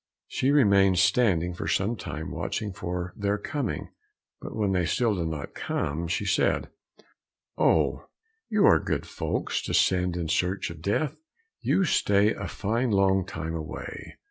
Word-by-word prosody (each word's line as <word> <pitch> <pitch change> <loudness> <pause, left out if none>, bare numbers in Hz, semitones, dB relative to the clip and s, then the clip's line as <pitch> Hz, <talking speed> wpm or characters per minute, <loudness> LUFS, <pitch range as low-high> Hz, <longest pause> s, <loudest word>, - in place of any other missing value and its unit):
She 130 - 0
remained 100 -9 +5
standing 90 -3 +3
for 85 - -5
some 105 +5 +1
time 100 - -6
watching 105 -3 -3
for 90 0 -4
their 100 0 0
coming, 130 +2 -3 0.5
but - - -7
when 105 -3 +1
they 90 -2 +1
still 115 +5 +1
did 85 -4 -2
not 80 -3 -5
come, 80 +4 -2
she 95 +4 -1
said, 100 +1 +1 0.8
"Oh, - - +2 0.4
you 215 -2 +3
are - - +6
good - - -2
folks - - -2
to - - -2
send 90 -1 +2
in 85 -2 -2
search 90 +3 0
of 80 -2 -11
death, 115 - -1 0.4
you 195 - +2
stay 105 - +3
a - - -5
fine 115 +5 -1
long 95 -2 +3
time 80 0 -5
away! 80 0 -7
95 Hz, 155 wpm, -27 LUFS, 85-110 Hz, 0.8 s, are